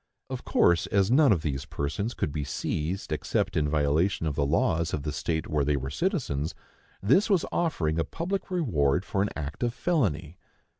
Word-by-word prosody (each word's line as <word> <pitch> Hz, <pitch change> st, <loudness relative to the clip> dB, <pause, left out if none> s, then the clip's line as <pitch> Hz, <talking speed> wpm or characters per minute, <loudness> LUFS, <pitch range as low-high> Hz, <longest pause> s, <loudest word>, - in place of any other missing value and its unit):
Of -, -, -4 dB
course, 85 Hz, -1 st, +3 dB
as 100 Hz, +1 st, +2 dB
none 140 Hz, -1 st, +6 dB
of 85 Hz, -6 st, +2 dB
these 70 Hz, -3 st, -2 dB
persons 75 Hz, -, -3 dB
could -, -, -1 dB
be 75 Hz, 0 st, -3 dB
seized 75 Hz, +7 st, -3 dB
except 75 Hz, -2 st, -1 dB
in 75 Hz, -1 st, +1 dB
violation 80 Hz, +4 st, +1 dB
of 75 Hz, -, 0 dB
the 70 Hz, -1 st, 0 dB
laws 80 Hz, +3 st, +1 dB
of 70 Hz, -, -5 dB
the 75 Hz, -, -2 dB
state 80 Hz, +1 st, -2 dB
where 75 Hz, -2 st, +1 dB
they 75 Hz, +1 st, +1 dB
were 65 Hz, 0 st, -4 dB
citizens, 90 Hz, -, -1 dB, 0.5 s
this 180 Hz, -, +4 dB
was 190 Hz, -5 st, +3 dB
offering 85 Hz, -, 0 dB
a -, -, +2 dB
public 185 Hz, -, -3 dB
reward 95 Hz, -, +1 dB
for 95 Hz, -, -1 dB
an 100 Hz, -, +1 dB
act 75 Hz, -1 st, -5 dB
of 120 Hz, 0 st, 0 dB
felony. 90 Hz, -, 0 dB
80 Hz, 190 wpm, -27 LUFS, 75-115 Hz, 0.5 s, none